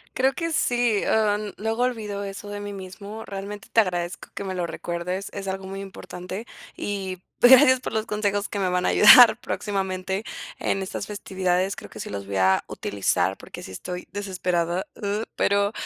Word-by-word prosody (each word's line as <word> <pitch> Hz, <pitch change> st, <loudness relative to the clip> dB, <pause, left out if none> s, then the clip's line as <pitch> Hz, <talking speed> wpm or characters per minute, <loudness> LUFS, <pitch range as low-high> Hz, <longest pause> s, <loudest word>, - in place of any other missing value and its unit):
Creo 265 Hz, +1 st, +3 dB
que 330 Hz, +2 st, -3 dB
sí, 240 Hz, -7 st, +2 dB
am, 210 Hz, -1 st, +1 dB
luego 225 Hz, +4 st, -1 dB
olvido 215 Hz, -5 st, -2 dB
eso 200 Hz, +1 st, -7 dB
de 205 Hz, 0 st, -5 dB
mí 205 Hz, 0 st, -6 dB
mismo. 200 Hz, +3 st, -8 dB
Realmente 200 Hz, +1 st, -7 dB
te -, -, +4 dB
agradezco 175 Hz, -3 st, -3 dB
que -, -, -5 dB
me 190 Hz, -1 st, -4 dB
lo 175 Hz, -1 st, -1 dB
recuerdes. 175 Hz, +3 st, -4 dB
Es 195 Hz, -1 st, -5 dB
algo 190 Hz, 0 st, -3 dB
muy 195 Hz, +1 st, -6 dB
importante. 190 Hz, +1 st, -7 dB, 0.3 s
Y 190 Hz, -3 st, -4 dB, 0.2 s
gracias 260 Hz, +1 st, +8 dB
por -, -, -5 dB
los 220 Hz, 0 st, 0 dB
consejos 205 Hz, -1 st, -1 dB
que 205 Hz, -, -3 dB
me 190 Hz, -, +1 dB
van 180 Hz, 0 st, 0 dB
a -, -, +3 dB
ayudar 225 Hz, +1 st, +9 dB
próximamente 190 Hz, -3 st, -2 dB, 0.4 s
en 195 Hz, -, 0 dB
estas 190 Hz, +1 st, -4 dB
festividades. 190 Hz, -2 st, -1 dB
Creo -, -, -10 dB
que 110 Hz, -, -11 dB
sí -, -, -6 dB
los 100 Hz, -1 st, -5 dB
voy 100 Hz, 0 st, -5 dB
a 95 Hz, 0 st, +4 dB
utilizar, 100 Hz, -1 st, 0 dB
porque -, -, -10 dB
sí -, -, -9 dB
estoy 180 Hz, -, -6 dB
desesperado, 180 Hz, -3 st, -1 dB
uh. 205 Hz, 0 st, -2 dB
Pero, 200 Hz, 0 st, +2 dB
200 Hz, 180 wpm, -25 LUFS, 185-210 Hz, 0.4 s, ayudar